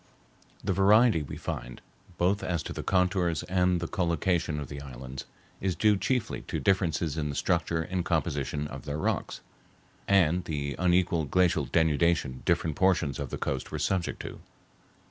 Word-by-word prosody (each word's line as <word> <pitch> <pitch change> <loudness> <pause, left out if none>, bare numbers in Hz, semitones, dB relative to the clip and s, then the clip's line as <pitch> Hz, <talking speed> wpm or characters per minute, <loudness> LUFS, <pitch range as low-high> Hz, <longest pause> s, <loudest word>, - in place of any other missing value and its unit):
The 95 - 0
variety 100 0 +5
we 70 - -7
find, 60 - -5 0.4
both 95 +4 +2
as 85 -4 -1
to - - -5
the - - -4
contours 90 -3 +1
and 90 -1 +2
the 85 - -3
collocation 85 -4 0
of 70 - -5
the 70 +1 -7
islands, 65 -1 -8 0.3
is 95 -2 -1
due 105 +5 +4
chiefly 125 +3 -1
to - - -2
differences 85 -5 +1
in 75 -1 -1
the 70 - -4
structure 80 +3 0
and 90 +1 -2
composition 75 -4 -1
of - - -9
their 75 0 -3
rocks, 80 - -2 0.7
and 90 -3 +3
the 70 -3 -3
unequal 90 -2 +2
glacial 85 0 +2
denudation 80 -4 +1
different 80 -3 +1
portions 90 -7 +2
of 70 -3 -4
the - - -4
coast 65 -2 -3
were - - -3
subjected 95 -3 -1
to. - - -11
85 Hz, 165 wpm, -28 LUFS, 75-90 Hz, 0.7 s, variety